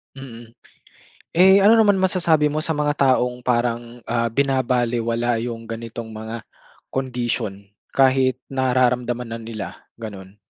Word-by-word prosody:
Mm. 120 Hz, -4 st, -11 dB, 0.8 s
Eh, 190 Hz, +3 st, +6 dB
ano 215 Hz, -, +7 dB
naman 215 Hz, -3 st, +4 dB
masasabi 180 Hz, -5 st, +2 dB
mo 150 Hz, +1 st, 0 dB
sa 160 Hz, -1 st, -2 dB
mga 150 Hz, 0 st, +1 dB, 0.2 s
taong 125 Hz, 0 st, -2 dB
parang, 120 Hz, -1 st, -2 dB
ah, 115 Hz, 0 st, 0 dB
binabalewala 120 Hz, -3 st, 0 dB
yung 115 Hz, -1 st, -5 dB
ganitong 115 Hz, 0 st, -7 dB
mga 110 Hz, +1 st, -7 dB, 0.5 s
condition, 120 Hz, -6 st, -3 dB, 0.2 s
kahit 130 Hz, -1 st, +3 dB, 0.2 s
nararamdaman 125 Hz, -2 st, +1 dB
na 115 Hz, -, -5 dB
nila, 110 Hz, -4 st, -6 dB, 0.3 s
gano'n? 100 Hz, -3 st, -9 dB
120 Hz, 120 wpm, -22 LUFS, 115-135 Hz, 0.8 s, ano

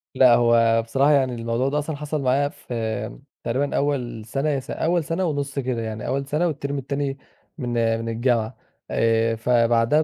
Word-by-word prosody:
لأ، 130 Hz, -2 st, +7 dB
هو 115 Hz, -1 st, +4 dB
بصراحة 135 Hz, +6 st, +2 dB
يعني 130 Hz, -4 st, +2 dB
الموضوع 115 Hz, +3 st, -1 dB
ده 150 Hz, +2 st, 0 dB
أصلًا 150 Hz, +1 st, -3 dB
حصل 150 Hz, +1 st, -3 dB
معايا 135 Hz, +2 st, +2 dB
في 110 Hz, -, -4 dB, 0.2 s
تقريبًا 135 Hz, +4 st, -1 dB
أول 125 Hz, -6 st, -1 dB
سنة 135 Hz, +6 st, -1 dB
يا 140 Hz, -2 st, +1 dB
س 130 Hz, -, -9 dB
أول 170 Hz, +1 st, +1 dB
سنة 165 Hz, +4 st, -1 dB
ونص 140 Hz, -3 st, -2 dB
كده، 125 Hz, -3 st, -2 dB
يعني 110 Hz, -1 st, -5 dB
أول 140 Hz, 0 st, -1 dB
سنة 155 Hz, +5 st, +1 dB
والتِرم 140 Hz, -3 st, -3 dB
التاني 140 Hz, +1 st, -2 dB, 0.4 s
من 125 Hz, -5 st, -3 dB, 0.3 s
من 115 Hz, 0 st, -4 dB
الجامعة. 115 Hz, 0 st, 0 dB, 0.3 s
آآ 115 Hz, 0 st, +2 dB
فبعدها 115 Hz, +4 st, +3 dB
130 Hz, 175 wpm, -23 LUFS, 115-145 Hz, 0.4 s, لأ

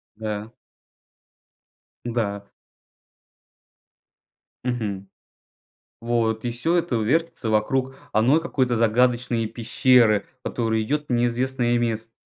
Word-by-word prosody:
Да. 105 Hz, 0 st, -5 dB, 1.5 s
Да. 110 Hz, -4 st, -2 dB, 2.2 s
Мгм. 105 Hz, -6 st, -3 dB, 0.9 s
Вот 115 Hz, -1 st, 0 dB
и 120 Hz, -, -1 dB
всё 160 Hz, +9 st, 0 dB
это 165 Hz, -8 st, 0 dB
вертится 135 Hz, 0 st, 0 dB
вокруг 130 Hz, +5 st, 0 dB, 0.2 s
одной 125 Hz, +9 st, +3 dB
какой-то 130 Hz, -7 st, 0 dB
загадочной 120 Hz, +1 st, +2 dB
пещеры, 115 Hz, -1 st, +3 dB, 0.2 s
которая 110 Hz, -2 st, -1 dB
идет 150 Hz, +6 st, -1 dB
в -, -, 0 dB
неизвестное 120 Hz, +1 st, +1 dB
место. 115 Hz, -1 st, -2 dB
120 Hz, 90 wpm, -23 LUFS, 110-125 Hz, 2.2 s, одной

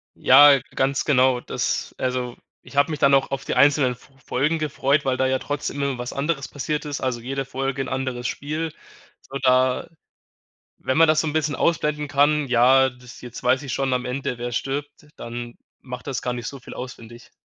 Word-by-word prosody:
Ja, 140 Hz, +1 st, +7 dB, 0.2 s
ganz 135 Hz, +1 st, 0 dB
genau. 130 Hz, -3 st, +3 dB
Das -, -, -3 dB
also, 125 Hz, -1 st, -2 dB, 0.2 s
ich -, -, -15 dB
habe 140 Hz, +3 st, +3 dB
mich 150 Hz, -, -4 dB
dann 140 Hz, 0 st, +4 dB
auch 135 Hz, 0 st, +1 dB
auf 135 Hz, 0 st, -3 dB
die -, -, -2 dB
einzelnen 140 Hz, -1 st, +4 dB
F 125 Hz, -, -19 dB
Folgen 150 Hz, +5 st, 0 dB
gefreut, 145 Hz, -1 st, 0 dB
weil 130 Hz, -1 st, +1 dB
da 130 Hz, -, +1 dB
ja 130 Hz, 0 st, +1 dB
trotzdem 145 Hz, 0 st, -4 dB
immer 140 Hz, -2 st, -1 dB
was 120 Hz, 0 st, -5 dB
anderes 140 Hz, 0 st, -2 dB
passiert 150 Hz, +2 st, -3 dB
ist, 145 Hz, -2 st, -4 dB
also, 125 Hz, -2 st, -1 dB
jede 135 Hz, +3 st, -4 dB
Folge 135 Hz, +1 st, -3 dB
'n -, -, -3 dB
anderes 130 Hz, -2 st, -3 dB
Spiel. 155 Hz, +3 st, -3 dB, 0.5 s
So, 135 Hz, -, -7 dB
da 130 Hz, 0 st, +2 dB, 0.9 s
wenn 130 Hz, -, -1 dB
man 165 Hz, -, +6 dB
das 155 Hz, 0 st, +4 dB
so 160 Hz, -, -2 dB
'n 150 Hz, -, -2 dB
bisschen 155 Hz, -2 st, 0 dB
ausblenden 150 Hz, -2 st, 0 dB
kann, 145 Hz, +1 st, +2 dB
ja, 130 Hz, +2 st, +5 dB
das, 125 Hz, -1 st, -14 dB
„Jetzt 120 Hz, -1 st, -9 dB
weiß 130 Hz, -, +2 dB
ich 135 Hz, -, -5 dB
schon 135 Hz, 0 st, -1 dB
am 125 Hz, 0 st, 0 dB
Ende, 125 Hz, -1 st, -3 dB
wer 120 Hz, 0 st, -4 dB
stirbt“, 145 Hz, +4 st, -4 dB
dann 120 Hz, 0 st, -7 dB, 0.2 s
macht 125 Hz, 0 st, -8 dB
das 135 Hz, -4 st, -3 dB
gar 125 Hz, -, -1 dB
nicht 120 Hz, -1 st, -5 dB
so 140 Hz, -2 st, -7 dB
viel -, -, -11 dB
aus 125 Hz, 0 st, -6 dB
finde 120 Hz, +1 st, -13 dB
ich. 120 Hz, -, -18 dB
135 Hz, 210 wpm, -23 LUFS, 125-145 Hz, 0.9 s, Ja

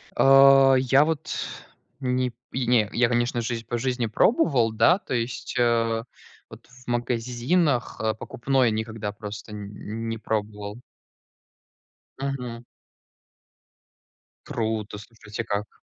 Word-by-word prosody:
А, 135 Hz, 0 st, +7 dB
я 135 Hz, +3 st, +4 dB
вот 160 Hz, -1 st, -3 dB, 0.7 s
не 125 Hz, -1 st, 0 dB
п 125 Hz, +2 st, -5 dB
не, 115 Hz, -4 st, +3 dB
я, 120 Hz, 0 st, +3 dB
конечно 120 Hz, 0 st, 0 dB
же, 115 Hz, 0 st, -3 dB
по 120 Hz, -, -2 dB
жизни 125 Hz, -1 st, -1 dB
пробовал, 125 Hz, -, +3 dB
да, 170 Hz, -, +4 dB
то -, -, -6 dB
есть, 120 Hz, 0 st, -3 dB
а, 115 Hz, -1 st, +2 dB, 0.5 s
вот -, -, -13 dB
в 125 Hz, 0 st, -19 dB
магазинах, 120 Hz, +4 st, 0 dB
э, 110 Hz, 0 st, +1 dB
покупной 125 Hz, +2 st, 0 dB
никогда 110 Hz, -1 st, -3 dB
просто 105 Hz, +1 st, -8 dB
н 105 Hz, +2 st, -6 dB
не 115 Hz, -, -3 dB
пробовал. 105 Hz, -1 st, -4 dB, 1.4 s
Мгм. 125 Hz, -4 st, -4 dB, 1.8 s
Круто, 110 Hz, -2 st, -3 dB
слушайте, 110 Hz, 0 st, -8 dB
как. 100 Hz, +1 st, -4 dB
120 Hz, 115 wpm, -25 LUFS, 110-130 Hz, 1.8 s, А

